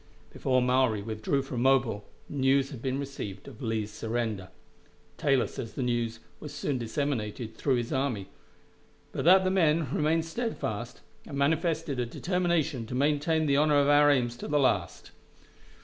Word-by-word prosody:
Before 130 -2 +1
Maury 125 -4 +2
withdrew 110 +6 -1
from 125 -3 -4
Mobile, 120 -6 +2 0.2
news 135 0 +2
had 130 -5 -8
been 130 0 -1
received 135 -9 -6
of - - -11
Lee's 110 -3 -2
surrender. 110 -5 -3 0.7
Taylor 135 +1 +2
says 115 -5 -7
the 130 - -3
news 120 -2 -1 0.2
was 150 - -8
soon 135 -3 -2
disseminated 115 -2 -3
through 135 -3 +1
his 120 +3 -2
army, 130 -8 -1 0.8
but - - -3
that 190 +2 +7
the 185 - +1
men 160 -6 +2
remained 160 +2 +1
steadfast, 165 - -4 0.3
and 140 - -6
manifested 155 -1 0
a 120 - 0
determination 165 -5 -1
to 125 - -5
maintain 150 +3 +2
the 140 -2 +3
honor 150 0 +4
of 140 0 +3
our 145 0 +6
aims 125 -4 +2
to - - -6
the 150 - +1
last. 135 - 0
135 Hz, 160 wpm, -28 LUFS, 120-150 Hz, 0.8 s, that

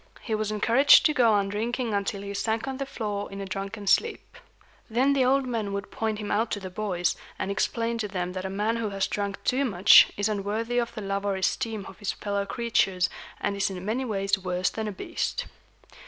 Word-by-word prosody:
He 225 - -4
was 215 -1 -1
encouraged 235 +7 +6
to 305 - +4
go 245 -6 +4
on 200 -1 +2
drinking 230 +3 -2
until 200 0 -2
he 200 0 -5
sank 220 +4 -1
on 265 -1 -3
the 275 0 -4
floor 205 -6 -4
in 195 - -7
a 195 - -4
drunken 200 +2 -5
sleep. 450 - +1 0.5
Then 255 +5 +3
the 270 -2 +3
old 270 +1 +3
men 225 -5 -2
would 200 +1 -4
point 220 -1 -2
him 210 -1 -4
out 220 +2 +1
to 205 - -2
the 190 -2 -7
boys, 180 -3 -1 0.2
and 195 - -2
explain 230 +4 -1
to 210 - -1
them 180 -2 -3
that 185 0 -4
a 190 - -3
man 210 +4 0
who 225 -2 -2
has 195 -1 0
drunk 200 -1 -3
too 260 +2 +2
much 200 -7 +7
is 205 +1 +1
unworthy 215 +3 -1
of 235 -1 -1
the 215 - -5
love 195 0 -2
or 200 -1 0
esteem 215 +2 -1
of 190 - -12
his 205 - -2
fellow 200 -1 -3
creatures, 195 -5 +1 0.3
and 200 - -1
is 200 0 0
in 185 -1 -7
many 230 +5 -1
ways 195 -4 0
worse 180 -1 -1
than 220 -1 -4
a - - -2
beast. 190 - -3
205 Hz, 225 wpm, -27 LUFS, 195-230 Hz, 0.5 s, much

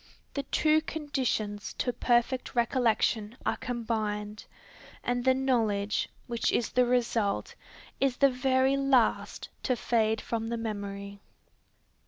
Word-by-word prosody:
The 280 - -1
two 305 +3 +2
conditions 260 -10 -2
to 245 - -1
perfect 245 +2 +1
recollection 235 -2 +1
are - - +1
combined, 215 -3 -3 0.6
and 245 0 0
the 260 0 +4
knowledge, 220 -6 +1 0.2
which 235 -1 0
is 235 - 0
the 250 -1 +3
result, 235 -4 0 0.5
is 270 -2 +1
the 275 -1 +5
very 260 +1 +2
last 275 -4 +1
to 255 - +1
fade 220 -2 +1
from 225 -1 -3
the 235 0 -2
memory. 200 -2 -5
240 Hz, 120 wpm, -29 LUFS, 215-260 Hz, 0.6 s, the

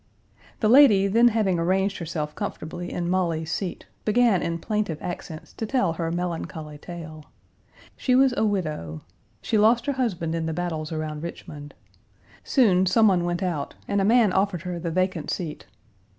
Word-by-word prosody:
The 215 - +3
lady 225 -5 +7
then 230 +5 +4
having 210 -6 +1
arranged 190 +3 0
herself 155 -3 -4
comfortably 175 +3 -5
in 175 -1 -3
Molly's 170 -3 -1
seat 185 0 -4 0.2
began 220 -3 +3
in 170 0 -2
plaintive 210 -3 -2
accents 170 -2 -7
to 225 - -5
tell 200 -9 +1
her 165 0 -3
melancholy 165 -3 -4
tale. 155 -2 -9 0.7
She 255 - +1
was 265 0 +5
a - - +1
widow. 155 - -2 0.4
She 220 - +1
lost 225 +3 +4
her 285 - 0
husband 185 -11 -2
in 165 -1 -2
the 160 - -2
battles 160 -3 -3
around 155 -1 -4
Richmond. 145 -3 -8 0.7
Soon 190 -8 +3
some 220 +5 +5
one 180 -3 +2
went 175 +2 -2
out 170 -6 -3
and 200 0 +1
a - - +2
man 220 -1 +4
offered 190 -4 0
her 180 -1 -4
the 170 0 -3
vacant 185 -2 -1
seat. 160 -4 -4
180 Hz, 165 wpm, -25 LUFS, 160-210 Hz, 0.7 s, lady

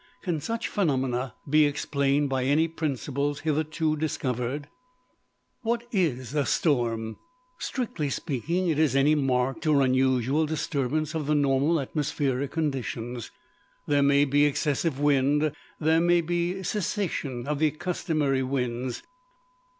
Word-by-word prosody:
Can 170 -6 -1
such 230 +8 -2
phenomena 130 - 0
be 155 +2 +5
explained 140 0 0
by 130 -1 -1
any 150 +4 +3
principles 145 -2 -2
hitherto 155 0 0
discovered? 140 -2 -2 0.9
What 235 0 -1
is 140 - 0
a 150 -1 +2
storm? 115 -8 0 0.4
Strictly 220 - -2
speaking, 165 +7 -1
it 155 -3 +1
is 150 -5 +3
any 140 +2 +4
marked 135 0 0
or 145 -3 +4
unusual 130 +3 +2
disturbance 155 0 -1
of 155 -3 -3
the 150 - +2
normal 145 +3 +2
atmospheric 140 -1 -1
conditions. 125 - -3 0.6
There 145 -1 +2
may 140 +1 +4
be 145 +1 +3
excessive 145 0 0
wind: 145 +1 +3 0.3
there 160 +1 +3
may 175 0 +4
be 175 +3 -1
cessation 170 - -2
of 150 -1 -1
the 155 0 +4
customary 155 -3 -1
winds. 125 -2 -2
145 Hz, 125 wpm, -27 LUFS, 130-160 Hz, 0.9 s, be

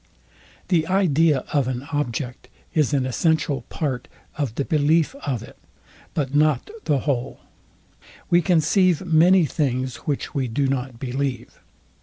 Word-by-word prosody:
The 165 -4 +2
idea 165 -6 +2
of 140 -4 +2
an 130 0 -3
object 125 -3 -3 0.2
is 150 -4 +2
an 135 -3 +1
essential 145 0 +1
part 135 -6 -3 0.3
of 140 -7 -3
the 140 - -1
belief 155 - +2
of 125 -6 -1
it, - - -14 0.6
but 140 -4 -1
not 155 - +2
the 140 -3 +1
whole. 130 -5 -2 0.9
We 175 0 +4
conceive 180 +1 +2
many 175 +2 +5
things, 130 -4 -1
which 145 -2 -3
we 135 -4 -1
do 135 +5 0
not 130 -2 -2
believe. 130 -1 -3
145 Hz, 135 wpm, -23 LUFS, 130-160 Hz, 0.9 s, many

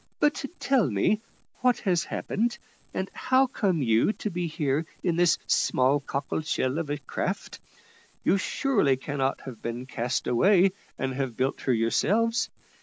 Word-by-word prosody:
But, 295 -1 +2 0.2
tell 260 - +2
me, 120 - +1 0.4
what 250 -2 +3
has 180 -4 +1
happened, 235 +3 -1 0.3
and 190 - -2
how 260 +1 +3
come 195 - 0
you 115 - +3
to 210 - -4
be 175 0 -2
here 155 -1 -1 0.2
in 175 -3 +1
this 175 -1 +4
small 130 +3 +3
cockle 140 +2 -3
shell 140 -1 -1
of 160 -3 -4
a 145 - -1
craft? 145 - -4 0.6
You 195 - +3
surely 200 - +1
cannot 135 0 -2
have 125 -5 -9
been 120 +2 -4
cast 120 -1 -2
away, 185 - +4 0.3
and 130 - -2
have 130 -3 -3
built 130 +2 0
her 130 - +1
yourselves. 210 - +2
155 Hz, 155 wpm, -27 LUFS, 130-200 Hz, 0.6 s, this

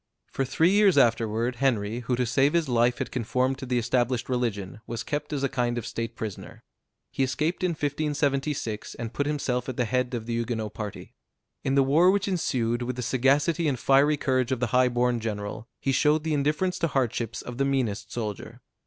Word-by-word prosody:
For 135 - -1
three 160 +7 +3
years 200 -4 +4
afterward 115 -1 +2
Henry, 115 -4 0
who 125 +1 -1
to 125 +1 0
save 135 +5 +2
his 170 -3 +2
life 120 0 +2
had - - -4
conformed 130 +2 0
to 130 - -6
the 125 0 0
established 120 +1 0
religion, 110 -6 -2
was 115 -1 -4
kept 150 +1 -3
as 140 -2 -2
a - - +3
kind 120 -2 -1
of 120 - -3
state 115 0 -4
prisoner. 105 -4 -7 0.5
He - - -3
escaped 150 +8 0
in 180 -2 +2
1576, 145 -5 -2
and 115 -1 -6
put 145 - -1
himself 130 -4 -1
at 130 - -5
the 125 - +1
head 125 +2 0
of 115 -2 -4
the 120 - -3
Huguenot 115 -2 -2
party. 105 -3 -7 0.5
In 135 - 0
the 140 - +5
war 155 +7 +5
which 200 +1 +2
ensued, 125 -10 0
with 125 +1 -3
the 125 - -4
sagacity 140 +7 +2
and 135 -4 0
fiery 140 +4 +4
courage 130 -2 0
of 130 - 0
the 125 - 0
high 125 0 +5
born 120 0 +1
general, 110 +1 -5
he 135 - 0
showed 150 +3 +3
the 160 -1 -1
indifference 150 +6 0
to 165 - +1
hardships 120 -5 -1
of 125 +1 -8
the - - +3
meanest 110 -7 -1
soldier. 105 -4 -5
125 Hz, 205 wpm, -26 LUFS, 115-145 Hz, 0.5 s, the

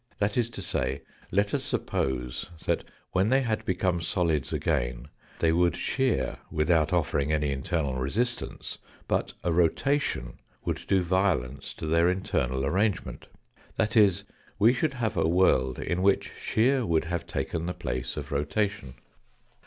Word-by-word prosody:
That 100 0 0
is 120 -2 +1
to 100 - -3
say, 70 -5 -1 0.3
let 100 +2 +1
us - - 0
suppose 60 -2 -2 0.2
that - - 0 0.3
when 95 +3 +2
they 135 +2 +4
had 110 -4 -1
become 90 -1 0
solids 85 -6 0
again - - -1 0.3
they 80 - +3
would 85 0 +3
shear 130 -2 0
without 80 0 +2
offering 70 +1 +1
any 75 -2 +1
internal 70 +1 -1
resistance, 105 - -2 0.3
but - - 0
a 85 - +1
rotation 85 - +1 0.3
would - - -1
do 95 -2 +3
violence 85 -8 0
to - - -6
their 85 +2 +3
internal 65 -8 0
arrangement. 95 +7 -1 0.5
That 110 +1 0
is, 100 -3 +5 0.3
we 110 +4 +5
should 140 +2 0
have 115 -4 -1
a - - +3
world 65 -8 +3
in 90 +1 -1
which 100 +1 +2
shear 125 +4 +2
would 85 -5 +1
have 85 0 -3
taken 85 0 -2
the 90 - -3
place 65 0 -3
of - - -5
rotation. 75 -1 -1
85 Hz, 150 wpm, -28 LUFS, 70-100 Hz, 0.5 s, is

